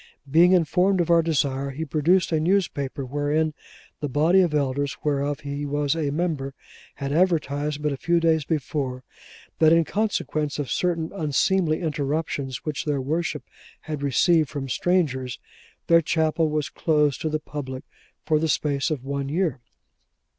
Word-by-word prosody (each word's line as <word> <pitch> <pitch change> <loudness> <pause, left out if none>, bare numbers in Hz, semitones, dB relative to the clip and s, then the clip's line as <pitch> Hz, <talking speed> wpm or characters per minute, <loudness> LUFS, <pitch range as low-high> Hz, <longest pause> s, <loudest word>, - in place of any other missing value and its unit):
Being 170 +6 +5
informed 180 +2 +3
of 170 -1 +1
our 170 0 +6
desire, 140 -4 0
he 150 +4 -4
produced 165 +5 +2
a 160 - +2
newspaper 155 -6 0
wherein 145 +3 0 0.5
the 145 - -3
body 160 +8 +4
of 175 -4 +2
elders, 140 -1 -1
whereof 145 -1 -1
he 145 0 -4
was 145 +1 0
a 155 -3 -1
member, 145 -3 -2 0.4
had 140 -1 -4
advertised 150 -4 0
but 150 - +1
a 140 - -3
few 170 +4 +1
days 160 -2 +2
before, 140 -4 -3 0.6
that 160 -1 +6
in 165 0 +5
consequence 155 -7 -1
of 145 -3 -3
certain 170 -3 0
unseemly 160 +1 +1
interruptions 145 -3 -2
which 150 -2 -3
their 145 -2 0
worship 150 +1 -2 0.4
had 150 -2 -5
received 155 +2 +3
from 135 -2 -5
strangers, 130 -6 0 0.5
their 170 0 +5
chapel 160 0 +1
was 150 -2 -1
closed 150 -4 +1
to 160 - -1
the 155 - 0
public 130 -4 -6 0.4
for 155 -1 +2
the 160 0 0
space 140 -2 0
of 150 -5 -3
one 140 0 -3
year. 160 -4 0
150 Hz, 155 wpm, -24 LUFS, 140-165 Hz, 0.6 s, our